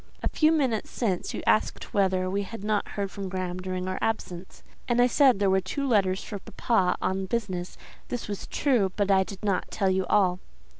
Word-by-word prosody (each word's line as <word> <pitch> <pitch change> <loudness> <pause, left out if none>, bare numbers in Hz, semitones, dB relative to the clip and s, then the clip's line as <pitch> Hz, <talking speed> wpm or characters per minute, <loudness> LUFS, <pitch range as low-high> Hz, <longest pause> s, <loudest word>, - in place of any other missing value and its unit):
"A - - +1
few 310 0 +3
minutes 265 -9 +1
since 195 -7 -1
you - - -5
asked 215 - +1
whether 190 -2 +2
we 195 +2 -1
had 205 +1 -7
not 210 -1 0
heard 200 -2 -4
from 195 -2 -5
Graham 185 -1 -3
during 185 0 -4
our 185 - -3
absence, 185 -5 -3 0.2
and 240 0 +1
I 245 - +7
said 255 -1 +4
there 200 0 +1
were 190 0 +3
two 275 +10 -3
letters 195 -6 +2
for 205 - -6
papa 190 -1 0
on 190 0 -1
business; 185 -5 -3 0.3
this 245 - -4
was 205 -2 -5
true, 240 -10 +1
but 200 -1 +1
I 190 0 +5
did 195 +1 -10
not 200 -3 0
tell 195 -3 +1
you 190 0 0
all." 185 -3 +3
195 Hz, 205 wpm, -27 LUFS, 185-225 Hz, 0.3 s, I